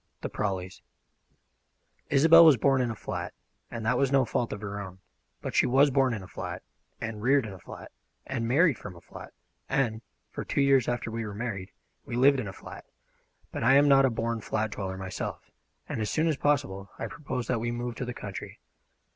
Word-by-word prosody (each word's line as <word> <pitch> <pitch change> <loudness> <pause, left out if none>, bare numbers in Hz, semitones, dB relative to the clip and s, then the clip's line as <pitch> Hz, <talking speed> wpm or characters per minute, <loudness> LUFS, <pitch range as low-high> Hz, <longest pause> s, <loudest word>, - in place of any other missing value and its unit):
THE - - -3
PRAWLEYS 95 -3 -3 1.3
ISOBEL 160 +4 +8
was 155 -5 +7
born 135 +3 +3
in 125 - 0
a 115 - -4
flat, - - -5 0.3
and 115 -2 -6
that 115 - +2
was 135 -1 +2
no 135 -2 +4
fault 120 0 -1
of 105 - -5
her 100 -1 -5
own; 95 -2 -8 0.5
but - - -4
she - - +4
was 135 +3 +4
born 130 -2 +2
in 100 - -7
a - - -10
flat, - - -6 0.4
and 110 -2 -5
reared 135 +2 +3
in 105 - -7
a 95 - -11
flat, - - -11 0.3
and 120 -4 -2
married 145 - +3
from 100 -3 -9
a 85 - -13
flat, - - -11 0.4
and, 115 -5 0 0.3
for - - -5
two - - 0
years 135 -3 +4
after 120 -2 -2
we 115 0 -3
were 105 -2 -6
married, 100 -4 -4 0.3
we 120 - -6
lived 135 +2 +5
in 110 - -3
a - - -5
flat; - - -11 0.7
but - - -4
I 130 +3 +6
am 145 +1 +6
not 135 -1 +6
a - - +3
born 115 -1 -2
flat 110 +1 -2
dweller 95 -2 -4
myself, 95 0 -6 0.4
and 110 - -3
as 105 - -1
soon 160 - +1
as 160 - +2
possible 100 -10 0
I - - -4
proposed 130 -6 -5
that 125 - +1
we 120 +1 -2
move 120 0 -3
to 125 - -3
the 125 -1 -5
country. 100 -2 -7
120 Hz, 215 wpm, -28 LUFS, 105-135 Hz, 1.3 s, ISOBEL